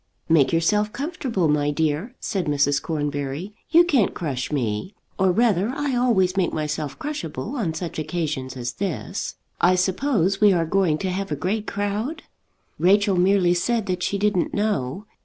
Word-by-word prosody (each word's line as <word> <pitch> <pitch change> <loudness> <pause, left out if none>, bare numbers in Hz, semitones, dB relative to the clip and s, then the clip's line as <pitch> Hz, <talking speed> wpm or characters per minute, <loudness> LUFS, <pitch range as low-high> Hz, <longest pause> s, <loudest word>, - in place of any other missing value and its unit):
"Make 160 -5 +4
yourself 210 +6 +2
comfortable, 270 - -2
my 145 -1 +2
dear," 160 - -1
said 190 -4 -2
Mrs. 145 -1 +2
Cornbury, 145 +3 -3 0.2
"you 340 +2 +7
can't 275 - +2
crush 140 -7 -3
me. 120 - -2 0.2
Or 190 -1 +4
rather 210 -1 +2
I 285 -3 -1
always 205 -7 +2
make 190 -3 +1
myself 150 -2 -3
crushable 215 - -5
on 180 - -2
such 165 -1 -4
occasions 150 -5 -3
as 120 -1 -4
this. 195 -4 -4 0.2
I 180 +1 +4
suppose 195 - +1
we 205 -2 +6
are 170 -2 +1
going 175 -2 +2
to 185 - 0
have 195 0 -3
a - - +1
great 200 +8 -2
crowd?" 210 +10 -2 0.6
Rachel 200 +2 +4
merely 180 0 +3
said 220 +5 0
that 185 -2 -2
she 200 - 0
didn't 205 -3 0
know. 205 -4 -1
185 Hz, 160 wpm, -23 LUFS, 155-210 Hz, 0.6 s, you